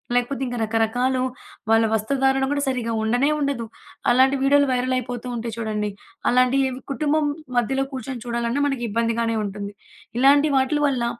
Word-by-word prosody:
లేకపోతే 245 Hz, +3 st, 0 dB
ఇంకా 245 Hz, -1 st, -4 dB
రకరకాలు 240 Hz, +4 st, +1 dB, 0.5 s
వాళ్ళ 225 Hz, 0 st, +5 dB
వస్త్రధారణ 265 Hz, +4 st, +1 dB
గూడా 285 Hz, 0 st, 0 dB
సరిగ్గా 240 Hz, -3 st, -1 dB
ఉండనే 245 Hz, +6 st, +2 dB
ఉండదు. 275 Hz, -5 st, -1 dB, 0.4 s
అలాంటి 260 Hz, +3 st, +5 dB
వీడియోలు 285 Hz, 0 st, +4 dB
వైరల్ 255 Hz, +1 st, 0 dB
అయిపోతూ 245 Hz, 0 st, -5 dB
ఉంటయి 230 Hz, -1 st, -4 dB
చూడండి. 210 Hz, -2 st, -2 dB, 0.4 s
అలాంటి 255 Hz, +2 st, +3 dB
ఇవ్ 255 Hz, -, -6 dB
కుటుంబం 305 Hz, +2 st, +1 dB, 0.3 s
మధ్యలో 270 Hz, +3 st, +1 dB
కూర్చొని 255 Hz, -1 st, -5 dB
చూడాలన్నా 235 Hz, +3 st, -1 dB
మనకి 270 Hz, -4 st, -2 dB
ఇబ్బందిగానే 230 Hz, +1 st, 0 dB
ఉంటుంది. 200 Hz, 0 st, -6 dB, 0.5 s
ఇలాంటి 285 Hz, +3 st, +5 dB
వాట్లు 280 Hz, +3 st, +1 dB
వల్ల 250 Hz, -4 st, 0 dB
250 Hz, 145 wpm, -23 LUFS, 230-270 Hz, 0.5 s, వాళ్ళ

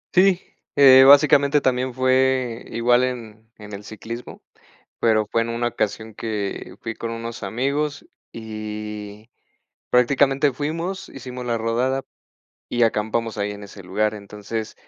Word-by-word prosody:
Sí, 185 Hz, 0 st, +5 dB, 0.3 s
eh, 130 Hz, -2 st, +8 dB
básicamente 145 Hz, 0 st, +6 dB
también 130 Hz, -1 st, 0 dB
fue 130 Hz, -2 st, +1 dB
igual 120 Hz, +2 st, +3 dB
en 110 Hz, -3 st, -5 dB
en 105 Hz, -1 st, -11 dB
el 100 Hz, +1 st, -7 dB
ciclismo, 115 Hz, +3 st, -9 dB, 0.6 s
pero 110 Hz, -2 st, +2 dB
fue 115 Hz, +2 st, +1 dB
en 115 Hz, -, -5 dB
una 120 Hz, +1 st, -1 dB
ocasión 110 Hz, -1 st, -3 dB
que 105 Hz, -3 st, -4 dB
fui 115 Hz, -1 st, -5 dB
con 115 Hz, 0 st, -5 dB
unos 115 Hz, -1 st, -6 dB
amigos, 140 Hz, +8 st, -2 dB, 0.3 s
y 105 Hz, -1 st, -7 dB, 0.6 s
prácticamente 135 Hz, +3 st, +3 dB
fuimos, 165 Hz, +8 st, -4 dB
hicimos 125 Hz, -1 st, -8 dB
la 115 Hz, -1 st, 0 dB
rodada 125 Hz, +4 st, 0 dB, 0.7 s
y 120 Hz, 0 st, 0 dB
acampamos 110 Hz, 0 st, 0 dB
ahí 100 Hz, 0 st, -1 dB
en 105 Hz, 0 st, -8 dB
ese 100 Hz, -1 st, -11 dB
lugar, 105 Hz, +4 st, 0 dB
entonces, 105 Hz, +2 st, -6 dB
115 Hz, 135 wpm, -22 LUFS, 110-130 Hz, 0.7 s, eh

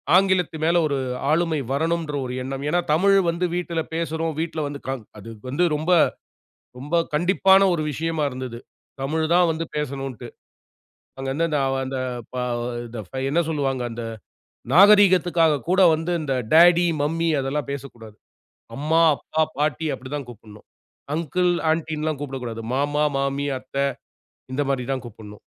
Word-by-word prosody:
ஆங்கிலத்து 185 Hz, -3 st, +3 dB
மேல 170 Hz, +2 st, +3 dB
ஒரு 140 Hz, -2 st, -1 dB, 0.3 s
ஆளுமை 160 Hz, -1 st, +1 dB
வரணும்ன்ற 160 Hz, +1 st, -1 dB
ஒரு 125 Hz, -, -5 dB
எண்ணம். 135 Hz, +1 st, -5 dB
ஏன்னா 175 Hz, +3 st, +2 dB
தமிழ் 195 Hz, +5 st, +4 dB
வந்து 170 Hz, +2 st, -1 dB
வீட்டில 170 Hz, -2 st, -2 dB
பேசுறோம். 165 Hz, -1 st, -2 dB
வீட்டில 160 Hz, -1 st, -2 dB
வந்து 145 Hz, 0 st, -6 dB
க -, -, -1 dB, 0.3 s
அது 105 Hz, +2 st, -10 dB, 0.2 s
வந்து 140 Hz, +7 st, +1 dB
ரொம்ப 155 Hz, +4 st, -1 dB, 0.9 s
ரொம்ப 145 Hz, +6 st, -2 dB, 0.2 s
கண்டிப்பான 190 Hz, +4 st, +4 dB
ஒரு 160 Hz, -, -1 dB
விஷயமா 160 Hz, +2 st, -2 dB
இருந்தது. 125 Hz, -2 st, -6 dB, 0.4 s
தமிழ் 160 Hz, +4 st, 0 dB
தான் 180 Hz, 0 st, +5 dB
வந்து 160 Hz, +1 st, -2 dB
பேசணும்ன்ட்டு. 135 Hz, -4 st, -4 dB, 0.9 s
அங்க 135 Hz, 0 st, -4 dB
வந்து 160 Hz, 0 st, 0 dB
அ -, -, +1 dB
வ -, -, -1 dB
அந்த 130 Hz, 0 st, -4 dB, 0.4 s
பா 125 Hz, -, -2 dB, 0.4 s
இந்த 115 Hz, -1 st, -7 dB
ஃபை 130 Hz, +6 st, -5 dB
என்ன 165 Hz, +4 st, +2 dB
சொல்வாங்க, 135 Hz, -5 st, -1 dB
அந்த, 115 Hz, 0 st, -6 dB, 0.7 s
நாகரீகத்துக்காக 180 Hz, -5 st, +5 dB
கூட 185 Hz, +1 st, +4 dB
வந்து 165 Hz, +3 st, -3 dB
இந்த 140 Hz, -3 st, -2 dB, 0.2 s
டாடி, 175 Hz, +2 st, +7 dB, 0.2 s
மம்மி 165 Hz, +3 st, 0 dB
அதெல்லாம் 135 Hz, +1 st, -2 dB
பேசக்கூடாது. 120 Hz, -6 st, -8 dB, 0.6 s
அம்மா, 155 Hz, +4 st, +2 dB
அப்பா, 155 Hz, +5 st, -1 dB, 0.2 s
பாட்டி 150 Hz, +1 st, 0 dB
அப்படி 130 Hz, 0 st, -10 dB
தான் 140 Hz, -3 st, -6 dB
கூப்பிடணும். 110 Hz, -2 st, -13 dB, 0.5 s
அங்கிள், 175 Hz, +3 st, +1 dB, 0.2 s
ஆண்டின்னுலாம் 155 Hz, -2 st, -1 dB
கூப்பிடக்கூடாது. 125 Hz, -5 st, -5 dB
மாமா, 145 Hz, +2 st, +1 dB
மாமி, 140 Hz, +1 st, -1 dB
அத்த. 130 Hz, +1 st, -15 dB, 0.8 s
இந்த 140 Hz, -, 0 dB
மாரி 135 Hz, -2 st, 0 dB
தான் 130 Hz, -, -4 dB
கூப்பிடணும். 105 Hz, -3 st, -11 dB
150 Hz, 145 wpm, -23 LUFS, 135-165 Hz, 0.9 s, டாடி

